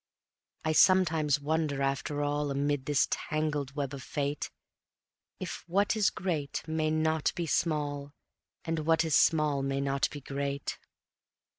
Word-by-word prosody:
I 160 Hz, -, +2 dB
sometimes 155 Hz, -4 st, +4 dB
wonder, 145 Hz, -1 st, 0 dB
after 140 Hz, +2 st, -1 dB
all, 145 Hz, 0 st, 0 dB
Amid 140 Hz, 0 st, -1 dB
this 145 Hz, -2 st, +3 dB
tangled 150 Hz, -3 st, -2 dB
web 140 Hz, -2 st, -2 dB
of 140 Hz, -, -6 dB
fate, 145 Hz, +2 st, -2 dB, 0.9 s
If -, -, -5 dB
what 200 Hz, +5 st, +2 dB
is 210 Hz, -3 st, +3 dB
great 155 Hz, -7 st, -3 dB
may 160 Hz, 0 st, 0 dB
not 155 Hz, 0 st, +1 dB
be 170 Hz, -, -2 dB
small, 145 Hz, -3 st, -1 dB, 0.5 s
And 165 Hz, -1 st, -1 dB
what 160 Hz, +1 st, +2 dB
is 160 Hz, -, +2 dB
small 150 Hz, -3 st, +3 dB
may 135 Hz, 0 st, -1 dB
not 140 Hz, 0 st, +1 dB
be 145 Hz, -, -7 dB
great. 140 Hz, 0 st, -3 dB
150 Hz, 140 wpm, -30 LUFS, 140-160 Hz, 0.9 s, sometimes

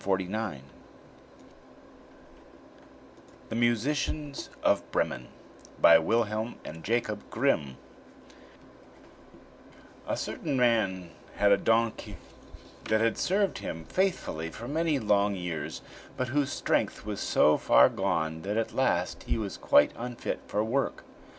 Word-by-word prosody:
THE 95 Hz, -4 st, -2 dB, 2.9 s
MUSICIANS 140 Hz, +5 st, -1 dB
OF -, -, +1 dB
BREMEN -, -, -1 dB, 0.5 s
BY 85 Hz, 0 st, +8 dB
WILHELM 110 Hz, +4 st, 0 dB
AND 80 Hz, +1 st, -8 dB
JAKOB 110 Hz, -2 st, -2 dB
GRIMM 80 Hz, -, 0 dB, 2.3 s
A -, -, -1 dB
certain 145 Hz, -4 st, -3 dB
man 105 Hz, -8 st, +1 dB, 0.2 s
had 100 Hz, 0 st, +3 dB
a 100 Hz, -, +6 dB
donkey 115 Hz, +2 st, 0 dB, 0.7 s
that 110 Hz, 0 st, +2 dB
had 115 Hz, 0 st, +2 dB
served 195 Hz, +1 st, +1 dB
him 80 Hz, 0 st, -6 dB
faithfully 180 Hz, -, -1 dB
for 115 Hz, +7 st, -8 dB
many 160 Hz, +1 st, +1 dB
long 105 Hz, -3 st, +2 dB
years, 80 Hz, -4 st, -5 dB, 0.3 s
but 130 Hz, -1 st, -2 dB
whose 140 Hz, +1 st, 0 dB
strength -, -, -1 dB
was -, -, -4 dB
so 75 Hz, -, +4 dB
far -, -, +6 dB
gone 90 Hz, -8 st, -1 dB
that 100 Hz, +5 st, -3 dB
at 115 Hz, -, -1 dB
last -, -, 0 dB
he -, -, -1 dB
was 105 Hz, -3 st, -4 dB
quite 75 Hz, -, +4 dB
unfit 120 Hz, 0 st, -4 dB
for 105 Hz, -, 0 dB
work. 130 Hz, +5 st, -1 dB
110 Hz, 110 wpm, -28 LUFS, 90-125 Hz, 2.9 s, BY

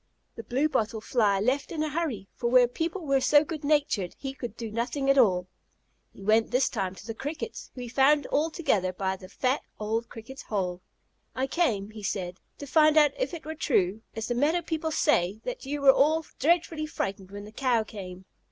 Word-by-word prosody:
The -, -, -6 dB
Blue 265 Hz, +5 st, 0 dB
bottle 220 Hz, -6 st, -1 dB
Fly 215 Hz, -3 st, +2 dB
left 260 Hz, +7 st, 0 dB
in 310 Hz, -2 st, -1 dB
a 310 Hz, -, -1 dB
hurry, 280 Hz, -, -3 dB
for 235 Hz, -, -2 dB
where 250 Hz, 0 st, +6 dB
people 330 Hz, +7 st, -3 dB
were 275 Hz, -2 st, +2 dB
so 290 Hz, +2 st, +5 dB
good 310 Hz, -1 st, -6 dB
natured 285 Hz, -, +1 dB
he 270 Hz, -1 st, -5 dB
could 240 Hz, -5 st, -7 dB
do 225 Hz, -2 st, -5 dB
nothing 255 Hz, +5 st, 0 dB
at 275 Hz, -, +2 dB
all. 185 Hz, -7 st, +4 dB, 0.7 s
He 195 Hz, -, -13 dB
went 220 Hz, +2 st, +3 dB
this 255 Hz, +2 st, +2 dB
time 190 Hz, -5 st, -3 dB
to 200 Hz, -, -12 dB
the 225 Hz, -, -4 dB
Crickets, 300 Hz, -, -6 dB
whom 250 Hz, -, -6 dB
he -, -, -6 dB
found 275 Hz, +4 st, +3 dB
all 305 Hz, +3 st, +2 dB
together 200 Hz, -, 0 dB
by 190 Hz, +1 st, -1 dB
the 185 Hz, -1 st, -12 dB
fat, 260 Hz, +6 st, 0 dB, 0.2 s
old 225 Hz, +2 st, -2 dB
Cricket's 235 Hz, +4 st, -10 dB
hole. 185 Hz, -4 st, -3 dB, 0.5 s
"I 260 Hz, -, 0 dB
came," 230 Hz, -, 0 dB
he 215 Hz, 0 st, -9 dB
said, 185 Hz, -3 st, -3 dB, 0.2 s
"to 285 Hz, -, -7 dB
find 310 Hz, +2 st, +4 dB
out 300 Hz, -1 st, +6 dB
if -, -, -2 dB
it 320 Hz, -, -10 dB
were 315 Hz, -, -4 dB
true, 220 Hz, -, +1 dB
as 225 Hz, 0 st, -3 dB
the 240 Hz, -, 0 dB
meadow 305 Hz, +8 st, +1 dB
people 320 Hz, -1 st, -2 dB
say, 210 Hz, -, +1 dB
that -, -, -5 dB
you 290 Hz, +1 st, -3 dB
were 270 Hz, -1 st, +8 dB
all 315 Hz, +4 st, +3 dB
dreadfully 320 Hz, 0 st, +1 dB
frightened 195 Hz, -9 st, -4 dB
when 205 Hz, +1 st, -8 dB
the 210 Hz, -, -11 dB
Cow 240 Hz, -1 st, +1 dB
came?" 190 Hz, -4 st, -9 dB
255 Hz, 210 wpm, -27 LUFS, 210-300 Hz, 0.7 s, were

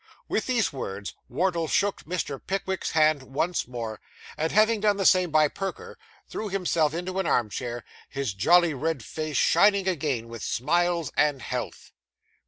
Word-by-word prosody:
With 215 Hz, -, -1 dB
these 240 Hz, -, +1 dB
words, 100 Hz, -6 st, -5 dB, 0.2 s
Wardle 170 Hz, +4 st, 0 dB
shook 200 Hz, +4 st, 0 dB
Mr. 155 Hz, -5 st, -3 dB
Pickwick's 190 Hz, 0 st, -2 dB
hand 155 Hz, -2 st, +4 dB
once 140 Hz, +6 st, -2 dB
more, 115 Hz, -3 st, -6 dB, 0.3 s
and, 160 Hz, +1 st, -1 dB
having 215 Hz, +1 st, +4 dB
done 205 Hz, -1 st, +2 dB
the 195 Hz, -, -1 dB
same 185 Hz, -1 st, +5 dB
by 155 Hz, -1 st, +4 dB
Perker, 320 Hz, -, -6 dB, 0.3 s
threw 215 Hz, -, -5 dB
himself 170 Hz, -5 st, +1 dB
into 185 Hz, +2 st, -3 dB
an 190 Hz, -, -1 dB
arm 115 Hz, -7 st, +1 dB
chair, 120 Hz, 0 st, -4 dB, 0.3 s
his 135 Hz, -7 st, -3 dB
jolly 170 Hz, -, +4 dB
red 140 Hz, -3 st, -2 dB
face 155 Hz, -2 st, -4 dB
shining 200 Hz, -2 st, +4 dB
again 140 Hz, -10 st, -1 dB
with 115 Hz, -1 st, -9 dB
smiles 170 Hz, +4 st, 0 dB
and 145 Hz, -3 st, +2 dB
health. 125 Hz, -2 st, -5 dB
160 Hz, 160 wpm, -26 LUFS, 135-190 Hz, 0.3 s, same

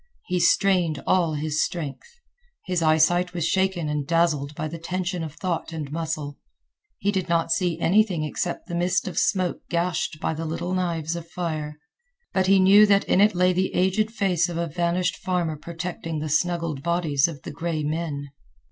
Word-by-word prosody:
He 180 Hz, -1 st, -1 dB
strained 175 Hz, -5 st, +2 dB
all 170 Hz, -4 st, +2 dB
his 150 Hz, +1 st, 0 dB
strength. 155 Hz, -, -5 dB, 0.6 s
His 180 Hz, -2 st, -1 dB
eyesight 175 Hz, +3 st, +3 dB
was 170 Hz, -2 st, 0 dB
shaken 190 Hz, -4 st, +1 dB
and 150 Hz, -2 st, -2 dB
dazzled 150 Hz, -4 st, +1 dB
by 155 Hz, -, -3 dB
the 165 Hz, +2 st, -7 dB
tension 180 Hz, +1 st, -3 dB
of 155 Hz, -2 st, -7 dB
thought 175 Hz, -2 st, -3 dB
and 150 Hz, -3 st, -5 dB
muscle. 155 Hz, -3 st, -4 dB, 0.6 s
He 200 Hz, -, 0 dB
did 185 Hz, -3 st, -2 dB
not 165 Hz, -1 st, +1 dB
see 175 Hz, -2 st, +1 dB
anything 185 Hz, -3 st, +2 dB
excepting 175 Hz, +3 st, -3 dB
the 175 Hz, -2 st, -2 dB
mist 180 Hz, +1 st, +1 dB
of 175 Hz, -3 st, -1 dB
smoke 185 Hz, -3 st, 0 dB
gashed 170 Hz, -2 st, -1 dB
by -, -, -1 dB
the 160 Hz, +1 st, -4 dB
little 170 Hz, +3 st, -3 dB
knives 170 Hz, -3 st, -1 dB
of 170 Hz, -1 st, -7 dB
fire, 155 Hz, -4 st, -4 dB, 0.6 s
but 190 Hz, -1 st, +2 dB
he 195 Hz, 0 st, +5 dB
knew 200 Hz, +3 st, +7 dB
that 200 Hz, -1 st, +4 dB
in 190 Hz, -, +2 dB
it 210 Hz, -1 st, +4 dB
lay 180 Hz, +1 st, +3 dB
the 185 Hz, +1 st, -1 dB
aged 190 Hz, +4 st, +2 dB
fence 185 Hz, -6 st, +1 dB
of 170 Hz, -, -4 dB
a 170 Hz, -, 0 dB
vanished 175 Hz, +2 st, -1 dB
farmer 180 Hz, -4 st, -1 dB
protecting 165 Hz, 0 st, -5 dB
the 155 Hz, 0 st, -3 dB
snuggled 165 Hz, -2 st, 0 dB
bodies 165 Hz, -4 st, +1 dB
of 150 Hz, -5 st, -8 dB
the -, -, -6 dB
gray 160 Hz, 0 st, -3 dB
men. 150 Hz, -2 st, -3 dB
170 Hz, 185 wpm, -24 LUFS, 155-180 Hz, 0.6 s, knew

